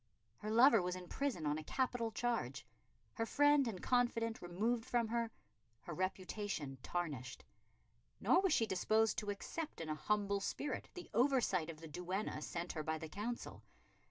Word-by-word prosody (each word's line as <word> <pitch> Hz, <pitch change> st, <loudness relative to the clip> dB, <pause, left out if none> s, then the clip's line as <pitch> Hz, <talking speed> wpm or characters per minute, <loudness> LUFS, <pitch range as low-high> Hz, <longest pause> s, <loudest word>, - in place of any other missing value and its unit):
Her 210 Hz, -, -5 dB
lover 230 Hz, 0 st, +7 dB
was 180 Hz, 0 st, -1 dB
in 180 Hz, -1 st, -8 dB
prison 260 Hz, -, -1 dB
on 150 Hz, +1 st, +1 dB
a -, -, -7 dB
capital 245 Hz, -, 0 dB
charge, 155 Hz, -, -1 dB, 0.5 s
her 225 Hz, -, -1 dB
friend 290 Hz, -1 st, +5 dB
and 195 Hz, -5 st, -4 dB
confidant 235 Hz, -2 st, +1 dB
removed 220 Hz, +7 st, 0 dB
from 235 Hz, -1 st, +1 dB
her, 230 Hz, 0 st, 0 dB, 0.5 s
her 170 Hz, -, -6 dB
reputation 185 Hz, -5 st, -3 dB
tarnished. 140 Hz, -8 st, -3 dB, 0.7 s
Nor 260 Hz, -, +5 dB
was 385 Hz, -2 st, +2 dB
she 230 Hz, -, +4 dB
disposed 215 Hz, +2 st, +2 dB
to 210 Hz, -, -5 dB
accept 310 Hz, -, -4 dB
in 165 Hz, -1 st, -4 dB
a -, -, +1 dB
humble 200 Hz, +5 st, +1 dB
spirit 285 Hz, +8 st, -3 dB
the 360 Hz, -, -7 dB
oversight 240 Hz, -, +3 dB
of 160 Hz, -1 st, -8 dB
the 165 Hz, -, -7 dB
duenna 180 Hz, +2 st, -3 dB
sent 170 Hz, +3 st, -3 dB
her 155 Hz, -, -3 dB
by 160 Hz, +1 st, -1 dB
the 160 Hz, 0 st, -7 dB
Council. 215 Hz, +8 st, -4 dB
205 Hz, 165 wpm, -38 LUFS, 170-235 Hz, 0.7 s, lover